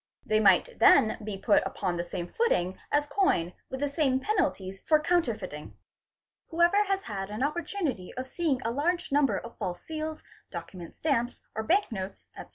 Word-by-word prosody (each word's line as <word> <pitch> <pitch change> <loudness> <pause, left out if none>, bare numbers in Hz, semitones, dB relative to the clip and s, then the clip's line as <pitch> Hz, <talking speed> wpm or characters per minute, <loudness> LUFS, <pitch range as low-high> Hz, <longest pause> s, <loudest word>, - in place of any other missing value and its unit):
They 215 0 +2
might 195 -4 +4
then 220 -1 +6
be 210 -2 -4
put 205 +2 +3
upon 185 -3 -2
the 170 - -2
same 175 0 -5
footing 190 - 0
as 290 0 +3
coin 290 - +1 0.2
with 265 +1 -5
the 290 - +2
same 280 -3 +1
penalties 265 - -1
for 310 -1 +5
counterfeiting. 225 - -1 0.4
| - - -64
Whoever 345 +5 +3
has 390 0 -1
had 195 -3 -5
an 215 +5 -3
opportunity 305 - -2
of 255 - -4
seeing 275 -2 -1
a 230 - -1
large 340 +7 -1
number 275 -7 +3
of 235 - -9
false 175 -1 -4
seals, 315 0 -5 0.3
document 170 0 -8
stamps, 245 -6 -1
or 220 - -2
bank 365 - +2
notes, 190 -2 -6
etc. - - -9
255 Hz, 175 wpm, -28 LUFS, 195-320 Hz, 0.4 s, then